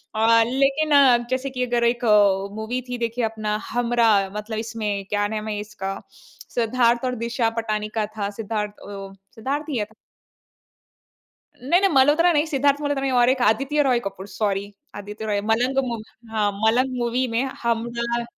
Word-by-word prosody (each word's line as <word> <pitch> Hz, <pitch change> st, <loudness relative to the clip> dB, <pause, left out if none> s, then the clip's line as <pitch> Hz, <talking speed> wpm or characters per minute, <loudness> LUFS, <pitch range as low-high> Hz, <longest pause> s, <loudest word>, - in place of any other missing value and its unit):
अ, 225 Hz, +1 st, +5 dB
लेकिन 275 Hz, +4 st, +1 dB
अ, 280 Hz, -, +8 dB
अब 240 Hz, 0 st, +1 dB
जैसे 255 Hz, +1 st, -1 dB
कि 250 Hz, -1 st, -2 dB
अगर 240 Hz, -1 st, 0 dB
एक 235 Hz, 0 st, +1 dB
अ, 200 Hz, -2 st, +3 dB
मूवी 220 Hz, +4 st, -3 dB
थी 245 Hz, -, -3 dB
देखिए 235 Hz, 0 st, -1 dB
अपना 215 Hz, -1 st, -2 dB, 0.2 s
हमराह 230 Hz, -4 st, +2 dB
मतलब 215 Hz, +1 st, -5 dB
इसमें 215 Hz, -3 st, -3 dB
क्या 205 Hz, 0 st, +1 dB
नाम 215 Hz, 0 st, -4 dB
है, 210 Hz, -1 st, -3 dB
इसका 200 Hz, -2 st, -5 dB, 0.6 s
सिद्धार्थ 235 Hz, 0 st, +2 dB
और 250 Hz, -, -1 dB
दिशा 235 Hz, 0 st, -1 dB
पटानी 215 Hz, -2 st, -1 dB
का 215 Hz, -, +1 dB
था, 200 Hz, -1 st, -1 dB
सिद्धार्थ 210 Hz, 0 st, -4 dB
अ, 195 Hz, -1 st, -7 dB, 0.2 s
सिद्धार्थ 275 Hz, +7 st, -3 dB
ही 275 Hz, -, -1 dB
है 210 Hz, -, 0 dB
ना? 220 Hz, +1 st, -12 dB, 1.6 s
नहीं, 260 Hz, -, -10 dB
नहीं 395 Hz, -, +4 dB
मल्होत्रा 295 Hz, +6 st, +5 dB
नहीं, 295 Hz, +1 st, +2 dB
सिद्धार्थ 285 Hz, -1 st, +1 dB
मल्होत्रा 285 Hz, -2 st, -1 dB
नहीं 270 Hz, -, 0 dB
और 240 Hz, -, +5 dB
एक 260 Hz, 0 st, +1 dB
आदित्य 275 Hz, +6 st, +2 dB
रॉय 255 Hz, -3 st, +2 dB
कपूर, 195 Hz, -3 st, -7 dB
सॉरी 200 Hz, 0 st, -2 dB, 0.2 s
आदित्य 210 Hz, +2 st, -7 dB
रॉय, 205 Hz, -1 st, 0 dB
मलंग 235 Hz, +5 st, 0 dB
मूवी 230 Hz, -3 st, -4 dB, 0.3 s
हाँ, 210 Hz, -2 st, +1 dB
मलंग 255 Hz, +3 st, +2 dB
मूवी 245 Hz, +2 st, 0 dB
में 230 Hz, +2 st, 0 dB, 0.2 s
हमराह 235 Hz, 0 st, -1 dB
230 Hz, 175 wpm, -23 LUFS, 210-255 Hz, 1.6 s, अ